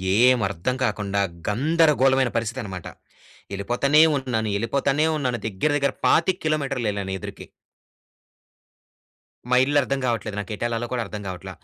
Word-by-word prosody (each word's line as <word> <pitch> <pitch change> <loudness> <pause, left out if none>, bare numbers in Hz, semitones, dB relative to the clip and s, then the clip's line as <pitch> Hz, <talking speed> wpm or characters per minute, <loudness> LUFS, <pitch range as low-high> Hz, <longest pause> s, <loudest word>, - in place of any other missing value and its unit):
ఏం 125 +3 +5
అర్థం 100 +7 -2
కాకుండా 105 -4 -1 0.3
గందరగోళమైన 135 +1 +3
పరిస్థితన్నమాట. 110 -6 -4 0.6
వెళ్ళిపోతానే 120 +9 +2 0.2
ఉన్నాను, 120 -5 -2
వెళ్ళిపోతానే 140 +7 +1
ఉన్నాను. 125 -5 -1
దగ్గర 110 +9 -1
దగ్గర 140 -1 0
25 180 +3 +3
కిలోమీటర్లెళ్ళాను 125 -10 -1
ఎదురికి. - - -8 2.1
మా 125 - +4
ఇల్లు 145 +2 +2
అర్థం 140 +1 -2
కావట్లేదు. 115 -3 -2
నాకు 100 +1 -6
ఎటుఏళ్లలో 120 +2 -2
కూడా 125 -2 0
అర్థం 105 -1 -7
కావట్ల. 95 +1 -7
120 Hz, 120 wpm, -23 LUFS, 105-140 Hz, 2.1 s, ఏం